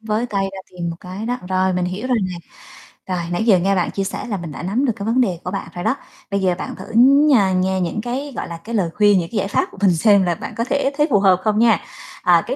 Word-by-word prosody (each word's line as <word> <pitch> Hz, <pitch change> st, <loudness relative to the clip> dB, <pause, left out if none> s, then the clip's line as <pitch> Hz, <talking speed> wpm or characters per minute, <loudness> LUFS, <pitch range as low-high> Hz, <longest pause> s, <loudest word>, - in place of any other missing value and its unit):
Với 220 Hz, +2 st, -1 dB
tay 200 Hz, -3 st, -1 dB
ra 195 Hz, -, -8 dB
tìm 175 Hz, -2 st, -4 dB
một 165 Hz, -, -6 dB
cái 190 Hz, +5 st, -7 dB
đó, 245 Hz, +1 st, -1 dB
rồi 185 Hz, 0 st, +1 dB
mình 180 Hz, 0 st, 0 dB
hiểu 190 Hz, +7 st, -4 dB
rồi 250 Hz, -3 st, +1 dB
nè. 180 Hz, -, -6 dB, 0.8 s
Rồi -, -, -2 dB
nãy 175 Hz, +5 st, 0 dB
giờ 195 Hz, -6 st, +5 dB
nghe 195 Hz, +2 st, +1 dB
bạn 180 Hz, -2 st, 0 dB
chia 195 Hz, -, -2 dB
sẻ 195 Hz, -, -4 dB
là 205 Hz, -4 st, -2 dB
mình 170 Hz, -3 st, -7 dB
đã 170 Hz, -, -7 dB
nắm 225 Hz, +10 st, 0 dB
được 235 Hz, -, +1 dB
cái 200 Hz, -1 st, -6 dB
vấn 240 Hz, +3 st, +2 dB
đề 180 Hz, -8 st, 0 dB
của 180 Hz, -, -4 dB
bạn 195 Hz, -, -4 dB
rồi 175 Hz, -, -5 dB
đó. 265 Hz, -, +1 dB, 0.4 s
Bây 200 Hz, -, +1 dB
giờ 180 Hz, -2 st, +2 dB
bạn -, -, -6 dB
thử -, -, -9 dB
nh 280 Hz, +5 st, +6 dB, 0.3 s
nghe 190 Hz, 0 st, 0 dB
những 180 Hz, +5 st, -2 dB
cái, 265 Hz, +4 st, -4 dB
gọi -, -, -4 dB
là, 170 Hz, -, -6 dB
cái 225 Hz, +7 st, -6 dB
lời 185 Hz, -6 st, +1 dB
khuyên, 205 Hz, -2 st, +5 dB
những 170 Hz, -, -4 dB
cái 220 Hz, -, -3 dB
giải 195 Hz, -, 0 dB
pháp 200 Hz, -, +1 dB
của -, -, -15 dB
mình 185 Hz, -4 st, +4 dB
xem 200 Hz, +2 st, +4 dB
là 175 Hz, -2 st, 0 dB
bạn -, -, -7 dB
có 230 Hz, -, +1 dB
thể 280 Hz, +2 st, 0 dB
thấy 295 Hz, +1 st, +3 dB
phù 205 Hz, -, +4 dB
hợp 190 Hz, -2 st, +4 dB
không 215 Hz, 0 st, +1 dB
nha. 230 Hz, -1 st, +4 dB, 0.4 s
À, -, -, +4 dB
cái -, -, -2 dB
200 Hz, 295 wpm, -20 LUFS, 180-235 Hz, 0.8 s, nh